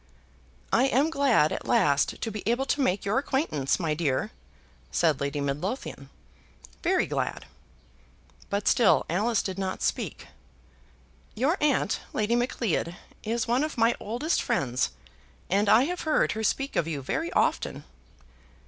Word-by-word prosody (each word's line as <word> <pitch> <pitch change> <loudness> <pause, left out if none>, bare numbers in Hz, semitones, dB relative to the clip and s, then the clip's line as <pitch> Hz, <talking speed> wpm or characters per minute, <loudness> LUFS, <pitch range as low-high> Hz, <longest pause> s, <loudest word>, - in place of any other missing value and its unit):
"I - - +5
am 275 +4 +2
glad 270 - +3
at - - -4
last 140 -1 +2
to 225 - -2
be 210 0 -5
able 240 +4 +1
to 285 - 0
make 200 -7 +1
your 205 +6 +2
acquaintance, 265 - 0
my 165 -4 0
dear," 150 -4 -1 0.6
said 160 -5 +1
Lady 140 +1 -2
Midlothian; 140 - -4 0.7
"very - - +2
glad." - - -3 1.0
But 200 0 -1
still 235 -4 +4
Alice 215 +5 +1
did 190 0 -4
not 190 -1 -3
speak. - - -2 1.1
"Your 270 +10 +2
aunt, 285 -7 +2
Lady 220 +2 +1
Macleod, 230 -8 -1 0.3
is 230 +1 -2
one 245 +4 +2
of 305 -3 -4
my 230 +1 +4
oldest 245 +10 -1
friends, 125 -2 0 0.6
and 200 +2 +3
I 225 +4 +6
have 355 +5 -3
heard 310 -1 +2
her 220 0 -3
speak 270 +5 -1
of 165 - +1
you 145 -4 -4
very 325 - -2
often." - - 0
220 Hz, 145 wpm, -27 LUFS, 165-265 Hz, 1.1 s, I